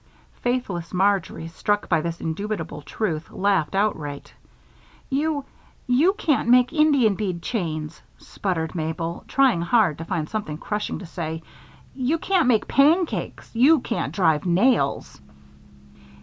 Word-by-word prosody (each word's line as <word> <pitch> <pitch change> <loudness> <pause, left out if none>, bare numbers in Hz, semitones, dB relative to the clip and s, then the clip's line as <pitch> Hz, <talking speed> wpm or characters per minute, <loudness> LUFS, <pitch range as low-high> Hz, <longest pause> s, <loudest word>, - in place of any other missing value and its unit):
Faithless 205 -9 -2
Marjory, 190 -3 +1
struck 205 +5 -1
by 165 -3 +2
this 170 +1 -4
indubitable 165 -3 -4
truth, 165 -2 -3
laughed 195 -4 0
outright. 155 -9 -2 0.8
"You 290 0 0 0.4
you 280 +9 +3
can't 300 - 0
make 250 +2 +5
Indian 290 -9 +4
bead 185 -4 -3
chains," 155 -9 -3 0.2
sputtered 165 -5 -3
Mabel, 165 0 -3
trying 260 -10 +3
hard 175 -3 +2
to 165 - -5
find 165 -3 -2
something 200 -8 -4
crushing 210 +5 -3
to 195 - -9
say. 160 -1 -5 0.5
"You 270 +5 0
can't 365 -3 +1
make 230 -4 +2
pancakes. 315 +5 +1
You 275 +7 +5
can't 235 - -3
drive 160 -6 +2
nails." 190 - +1
200 Hz, 125 wpm, -23 LUFS, 165-250 Hz, 0.8 s, make